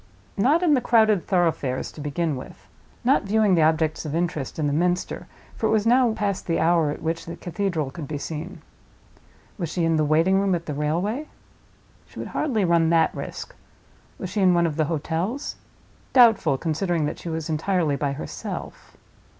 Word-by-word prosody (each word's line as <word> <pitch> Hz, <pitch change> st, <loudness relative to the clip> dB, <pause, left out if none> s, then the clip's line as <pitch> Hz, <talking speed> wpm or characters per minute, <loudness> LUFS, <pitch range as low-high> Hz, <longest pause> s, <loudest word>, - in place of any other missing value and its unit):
Not 285 Hz, -, +3 dB
in 325 Hz, -4 st, +4 dB
the 260 Hz, -, +3 dB
crowded 220 Hz, -5 st, +3 dB
thoroughfares, 165 Hz, -8 st, 0 dB
to 155 Hz, -, -10 dB
begin 150 Hz, +1 st, -1 dB
with. 130 Hz, -, -10 dB, 0.4 s
Not 260 Hz, +3 st, +4 dB
viewing 210 Hz, 0 st, +2 dB
the 170 Hz, -, +4 dB
objects 155 Hz, 0 st, +2 dB
of 155 Hz, -1 st, -4 dB
interest 165 Hz, -5 st, -2 dB
in 155 Hz, -, -1 dB
the 145 Hz, -, 0 dB
Minster, 175 Hz, +3 st, -1 dB, 0.3 s
for -, -, 0 dB
it -, -, 0 dB
was 215 Hz, -1 st, +2 dB
now 245 Hz, 0 st, +4 dB
past 200 Hz, -3 st, -2 dB
the 165 Hz, -, +1 dB
hour 165 Hz, -2 st, +3 dB
at 150 Hz, -, -5 dB
which 165 Hz, +1 st, -3 dB
the 170 Hz, -, -5 dB
cathedral 175 Hz, -4 st, -2 dB
could 145 Hz, +1 st, -7 dB
be 150 Hz, -, -4 dB
seen. 155 Hz, +2 st, -6 dB, 1.0 s
Was 170 Hz, -4 st, -2 dB
she 170 Hz, -2 st, 0 dB
in 165 Hz, -1 st, +2 dB
the 155 Hz, -, +2 dB
waiting 165 Hz, +6 st, +3 dB
room 195 Hz, -2 st, +2 dB
at 170 Hz, -1 st, -5 dB
the 150 Hz, -, -4 dB
railway? 175 Hz, -, -1 dB, 0.8 s
She -, -, -17 dB
would -, -, -5 dB
hardly 230 Hz, -10 st, 0 dB
run 170 Hz, -2 st, +3 dB
that 165 Hz, -1 st, +3 dB
risk. -, -, -7 dB, 0.6 s
Was 185 Hz, -, -6 dB
she 205 Hz, +1 st, -1 dB
in 185 Hz, -2 st, +5 dB
one 170 Hz, 0 st, +3 dB
of 160 Hz, -3 st, -1 dB
the 155 Hz, -, +1 dB
hotels? 170 Hz, -, -3 dB, 0.6 s
Doubtful, 225 Hz, -, +5 dB
considering 165 Hz, +1 st, -1 dB
that 150 Hz, -, -4 dB
she 170 Hz, -, -6 dB
was 160 Hz, -1 st, -3 dB
entirely 160 Hz, -1 st, 0 dB
by 140 Hz, 0 st, -1 dB
herself. 140 Hz, -, -7 dB
170 Hz, 190 wpm, -24 LUFS, 155-200 Hz, 1.0 s, in